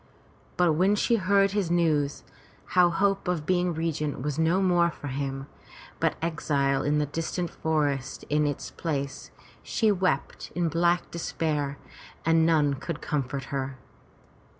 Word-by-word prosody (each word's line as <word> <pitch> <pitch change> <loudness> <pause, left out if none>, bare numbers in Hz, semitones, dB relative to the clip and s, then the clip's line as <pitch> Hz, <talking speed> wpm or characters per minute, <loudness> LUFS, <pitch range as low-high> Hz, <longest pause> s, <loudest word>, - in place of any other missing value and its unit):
But 175 -3 +4
when 185 +6 +3
she 230 +3 +2
heard 195 0 +3
his 200 -4 0
news, 155 -5 +1 0.5
how 180 -1 +6
hope 195 +2 +1
of 175 -4 -1
being 180 0 +2
regent 155 -5 -2
was 150 +1 -2
no 165 +3 +3
more 175 -3 +3
for 145 -3 -7
him, 135 0 -3 0.5
but - - +1
exile 140 -4 +1
in 145 +2 +1
the 150 - +2
distant 165 +4 -3
forest 145 -4 -1
in 150 0 +2
its 145 - -4
place, 140 -4 -4 0.3
she 220 -3 +1
wept 185 -8 -1
in 170 -1 +1
black 170 +2 +1
despair 150 -4 -2 0.5
and 165 0 +4
none 150 -4 +3
could 150 +3 -5
comfort 140 -2 -2
her. 135 -1 -3
160 Hz, 145 wpm, -27 LUFS, 145-175 Hz, 0.5 s, how